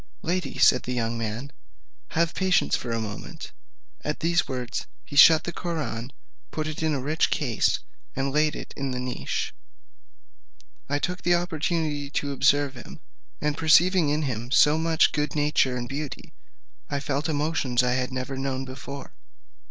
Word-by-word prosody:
"Lady," 175 -4 -2
said 125 - +6
the 125 - -4
young 115 -1 -1
man, 115 +4 -4 0.7
"have 170 0 +2
patience 190 -2 +2
for 125 - -5
a 115 0 -1
moment." 105 -2 -7 0.5
At 150 - -2
these 170 +1 +2
words 125 -2 -4 0.2
he 145 - -9
shut 155 +3 +8
the 175 - -4
Koraun, 150 -8 -3 0.4
put 155 - -3
it 155 0 -4
into 155 -2 +1
a - - -4
rich 155 +4 +1
case, 125 -7 +1 0.4
and 135 +1 -1
laid 150 0 +2
it - - -8
in 140 -1 -3
the 125 -1 -3
niche. 125 0 -3 1.4
I 145 - +1
took 180 +4 -2
that 175 0 +3
opportunity 160 -4 -1
to 145 0 -2
observe 140 0 +3
him, 120 - -11 0.4
and 150 0 0
perceiving 165 +1 +4
in 150 +2 +1
him 120 -3 -3
so 150 +3 +5
much 160 0 +3
good 150 -1 -1
nature 145 -4 +2
and 120 0 -4
beauty, 140 +2 -6 0.6
I 140 - -1
felt 145 +2 -2
emotions 145 -5 +1
I 125 - +2
had 130 0 -1
never 130 +1 -4
known 135 0 -2
before. 135 +1 -8
145 Hz, 165 wpm, -26 LUFS, 130-155 Hz, 1.4 s, shut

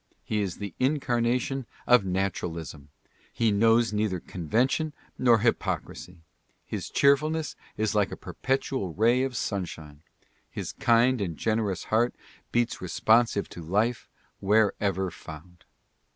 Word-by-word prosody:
He 105 -1 -1
is 95 -4 -3
the 100 -4 -6
incarnation 130 -2 0 0.2
of 125 -3 +6
naturalism. 85 -6 -3 0.4
He 115 -2 +1
knows 115 +2 +3
neither 105 -3 0
conven 95 - 0
tion 155 +2 -2 0.3
nor 120 -3 +5
hypocrisy. 90 -6 -2 0.4
His - - -5
cheerfulness 150 +3 +2 0.2
is 110 0 0
like 105 -2 +1
a - - -6
perpetual 130 - -2
ray 120 +5 +3
of 130 -2 -2
sunshine. 80 -7 -4 0.5
His - - -5
kind 120 -1 +3
and 85 -6 -3
generous 110 -4 -1
heart 120 +2 +3 0.4
beats 120 0 0
responsive 110 +4 +2
to 85 - -9
life 105 +9 0 0.3
wherever 100 -2 +1
found. 80 +2 -12
110 Hz, 125 wpm, -27 LUFS, 95-120 Hz, 0.5 s, of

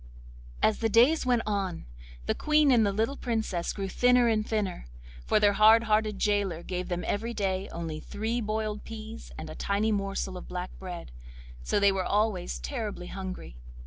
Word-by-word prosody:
As 215 - +3
the 225 - +1
days 250 +7 +4
went 245 -2 +3
on, 195 -4 -2 0.4
the - - +1
Queen 300 -2 +3
and 235 -3 +5
the 200 - +2
little 225 +7 0
Princess 220 -7 -2
grew 195 -1 -4
thinner 245 +4 +4
and 220 -2 +2
thinner, 210 - -2 0.4
for - - +4
their 205 -1 +4
hard 220 +2 +6
hearted 215 -1 +1
gaoler 200 -5 0
gave 180 -1 -4
them 175 0 -2
every 230 +3 -2
day 190 -2 -1
only 165 -2 -5
three 225 +8 -3
boiled 215 -1 -2
peas 225 0 -9
and 160 - -6
a 155 - -7
tiny 205 +5 0
morsel 195 -2 -2
of - - -9
black 180 0 -5
bread, 180 - -7 0.5
so 60 - 0
they 200 0 +5
were 195 -1 -1
always 205 -3 0
terribly 215 -9 -4
hungry. 185 - -6
210 Hz, 175 wpm, -28 LUFS, 190-225 Hz, 0.5 s, hard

